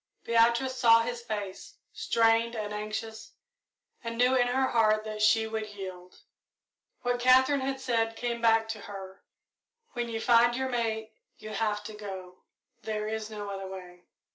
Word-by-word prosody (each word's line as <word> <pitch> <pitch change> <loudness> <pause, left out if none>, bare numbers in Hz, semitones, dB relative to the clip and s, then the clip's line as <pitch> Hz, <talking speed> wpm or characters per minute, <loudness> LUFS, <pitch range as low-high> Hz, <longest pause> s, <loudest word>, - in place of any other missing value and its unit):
Beatrice 235 +3 +2
saw 230 -2 +6
his 240 0 -4
face, 205 -5 -6 0.2
strained 230 +1 +2
and 210 -1 -4
anxious, 215 +1 -5 0.7
and 230 0 -5
knew 250 +2 +4
in 245 -2 +3
her 260 +1 +1
heart 215 -2 +3
that 215 -1 -5
she 220 +1 +4
would 220 -1 -4
yield. 185 -2 -9 0.8
What 245 0 0
Katherine 260 +3 +5
had 265 0 -2
said 225 -3 0
came 235 0 -3
back 225 -1 +4
to 225 -1 -4
her 195 -1 -9 0.7
"When 240 -1 -3
you 225 -1 -3
find 240 +1 +4
your 260 +1 -2
mate, 220 -3 -2 0.2
you 215 - -9
have 210 -1 -1
to 215 - -8
go 190 -3 -8 0.4
there 215 -1 -3
is 220 0 -4
no 205 -2 -6
other 195 -1 -5
way." 180 -2 -10
225 Hz, 160 wpm, -29 LUFS, 210-240 Hz, 0.8 s, saw